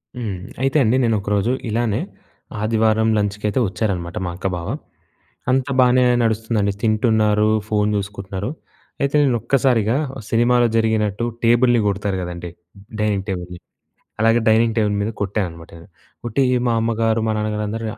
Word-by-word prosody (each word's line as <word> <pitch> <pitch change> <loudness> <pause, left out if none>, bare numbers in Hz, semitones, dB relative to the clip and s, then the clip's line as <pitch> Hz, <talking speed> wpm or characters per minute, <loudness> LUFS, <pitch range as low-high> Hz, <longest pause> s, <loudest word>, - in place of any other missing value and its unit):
హ్మ్. 110 -6 -4 0.2
అయితే 135 +3 +2
అండి 120 +3 +2
నేను 115 -2 +2
ఒకరోజు 100 +3 0 0.2
ఇలానే 115 -1 0 0.6
ఆదివారం 110 0 +2
లంచ్‌కి 105 0 -2
అయితే 105 +5 0
వచ్చారనమాట 90 -4 -3
మా 85 - -3
అక్క, 90 - -11
బావ. 85 - -6 0.8
అంతా 135 +1 +1
బానే 125 0 +4 0.2
నడుస్తుందండి 110 -2 0
తింటున్నారు 110 -1 +2 0.2
ఫోను 105 -1 +1
చూసుకుంటున్నారు. 100 +1 -4 0.5
అయితే 140 0 0
నేను 130 -4 +2
ఒక్కసారిగా 125 -3 +2 0.3
సినిమాలో 120 +1 +3
జరిగినట్టు 110 -1 +1 0.2
టేబుల్‍ని 120 +1 +4
కొడతారు 100 -1 -1
కదండీ 85 0 -6 0.5
డైనింగ్ 105 -2 0
టేబుల్‍ని. 90 -2 -5 0.6
అలాగ 115 +1 +4
డైనింగ్ 110 0 +3
టేబుల్ 105 -2 +2
మీద 105 - -1
కొట్టా 100 +2 -1
అనమాట 85 -1 -12
నేను. 85 - -15 0.4
కొట్టి 120 +3 0 0.2
మా 120 - +2
అమ్మగారు, 115 0 +1
మా - - +1
నాన్నగారు 105 0 -2
అందరూ 115 +2 -4
110 Hz, 140 wpm, -20 LUFS, 100-115 Hz, 0.8 s, బానే